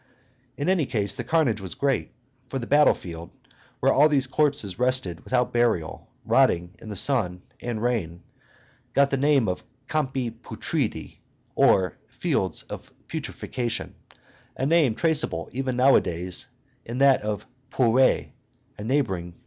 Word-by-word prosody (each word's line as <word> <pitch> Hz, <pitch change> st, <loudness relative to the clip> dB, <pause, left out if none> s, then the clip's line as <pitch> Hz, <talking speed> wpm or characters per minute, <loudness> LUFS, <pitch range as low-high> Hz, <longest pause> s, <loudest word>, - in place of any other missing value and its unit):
In 145 Hz, -, -2 dB
any 180 Hz, -7 st, +2 dB
case, 100 Hz, -4 st, 0 dB
the 125 Hz, -, -5 dB
carnage 125 Hz, -6 st, +1 dB
was 95 Hz, -5 st, -5 dB
great, 140 Hz, -2 st, 0 dB, 0.4 s
for 135 Hz, -, -3 dB
the 120 Hz, -, -4 dB
battle 145 Hz, +3 st, +5 dB
field, 85 Hz, -1 st, -9 dB, 0.4 s
where -, -, +3 dB
all 150 Hz, +3 st, +5 dB
these 140 Hz, -3 st, +2 dB
corpses 135 Hz, -9 st, 0 dB
rested 125 Hz, -10 st, 0 dB
without 125 Hz, -3 st, 0 dB
burial, 115 Hz, -9 st, 0 dB, 0.2 s
rotting 85 Hz, +1 st, +2 dB
in 110 Hz, -, -10 dB
the 105 Hz, -, -5 dB
sun 95 Hz, -6 st, +2 dB, 0.2 s
and 115 Hz, -2 st, -4 dB
rain, 90 Hz, -9 st, -2 dB, 0.7 s
got 140 Hz, 0 st, +4 dB
the 135 Hz, -, +1 dB
name 140 Hz, -4 st, +3 dB
of 90 Hz, -, -2 dB, 0.2 s
Campi 135 Hz, -6 st, -1 dB
Putridi, -, -, -4 dB, 0.3 s
or 90 Hz, -3 st, +3 dB
Fields -, -, -1 dB
of -, -, -9 dB, 0.2 s
Putrefaction, 120 Hz, -2 st, -4 dB, 0.6 s
a 130 Hz, -, -1 dB
name 150 Hz, -6 st, +3 dB
traceable 150 Hz, -, 0 dB
even 130 Hz, 0 st, -2 dB
nowadays 90 Hz, -7 st, +2 dB, 0.4 s
in 120 Hz, +2 st, -6 dB
that 135 Hz, 0 st, +5 dB
of 105 Hz, 0 st, -3 dB, 0.2 s
Pourrires, 130 Hz, 0 st, +3 dB, 0.5 s
a -, -, -5 dB
neighboring 110 Hz, -8 st, 0 dB
village. -, -, -27 dB
125 Hz, 140 wpm, -25 LUFS, 100-140 Hz, 0.7 s, battle